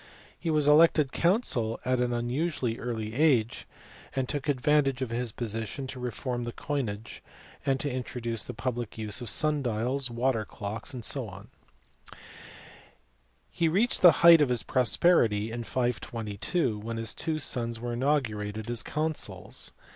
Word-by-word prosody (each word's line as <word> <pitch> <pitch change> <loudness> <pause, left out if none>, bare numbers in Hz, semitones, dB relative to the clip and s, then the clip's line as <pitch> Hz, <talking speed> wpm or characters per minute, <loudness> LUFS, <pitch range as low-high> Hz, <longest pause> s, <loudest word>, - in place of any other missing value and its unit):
He 170 - -3
was 150 -2 +2
elected 150 -2 +5
consul 170 - +1
at 130 0 +1
an 125 0 +1
unusually 120 0 -1
early 110 -3 -4
age, 130 -5 +2 0.5
and 130 -1 0
took 145 +1 -3
advantage 135 -1 +2
of 120 - -5
his 120 0 -2
position 115 +4 -4
to 130 0 -7
reform 125 0 -3
the 120 - -4
coinage 115 -7 -4 0.5
and 135 -1 +2
to 145 - -2
introduce 120 -3 -3
the - - -6
public 120 -2 -4
use 110 +1 -3
of 120 - -3
sun 150 +3 +1
dials, 125 +3 0
water 120 -1 0
clocks, 110 +6 -6
&c. 115 - -1 2.2
He 165 - +1
reached 200 +9 +2
the 175 - +10
height 170 -2 +10
of 145 - +3
his 125 -2 +1
prosperity 115 -5 +2
in 120 0 -5
522 115 - -2
when 115 +2 -5
his 115 0 -2
two 160 -2 -1
sons 115 -6 -1
were 120 0 -4
inaugurated 110 -5 -1
as 120 -1 0
consuls. 155 0 -2
125 Hz, 145 wpm, -28 LUFS, 115-145 Hz, 2.2 s, the